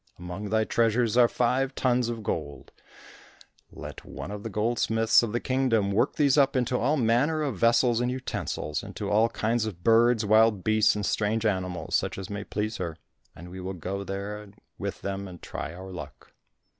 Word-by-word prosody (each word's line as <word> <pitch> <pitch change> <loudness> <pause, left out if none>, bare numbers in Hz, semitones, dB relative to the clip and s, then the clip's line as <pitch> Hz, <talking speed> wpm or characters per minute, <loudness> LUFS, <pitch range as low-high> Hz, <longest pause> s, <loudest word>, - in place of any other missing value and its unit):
Among 90 +4 -6
thy 110 +1 +2
treasures 115 +1 +1
are 120 -1 +6
five 130 +3 0
tons 125 -2 +1
of 115 -2 -5
gold; 75 -7 -4 1.0
let - - -9
one - - -8
of 105 -1 -6
the 115 - -5
goldsmiths 110 +1 +2
of 115 -3 -2
the 120 - 0
Kingdom 120 -7 +1
work 105 +4 +1
these 145 -1 +3
up 135 -1 +3
into 125 -1 +1
all 145 +6 +1
manner 135 +6 +2
of 130 -10 -3
vessels 115 0 +3
and 125 - 0
utensils, 125 - -3
into - - -5
all 110 +3 +4
kinds 115 0 0
of 90 -5 -8
birds, 115 0 +4
wild 110 -2 +4
beasts 110 0 +3
and 105 -1 -2
strange 110 +2 0
animals, 95 -4 -2
such - - 0
as 95 0 -7
may 100 0 -4
please 110 +2 -3
her, 85 -4 -4 0.4
and 90 +1 -11
we 95 - -8
will 95 +1 -5
go 95 +3 -4
there 100 +2 -5 0.3
with - - -4
them 100 0 -4
and 90 -2 -12
try 80 - -5
our 95 +2 -9
luck." 75 -7 -10
110 Hz, 185 wpm, -27 LUFS, 95-120 Hz, 1.0 s, are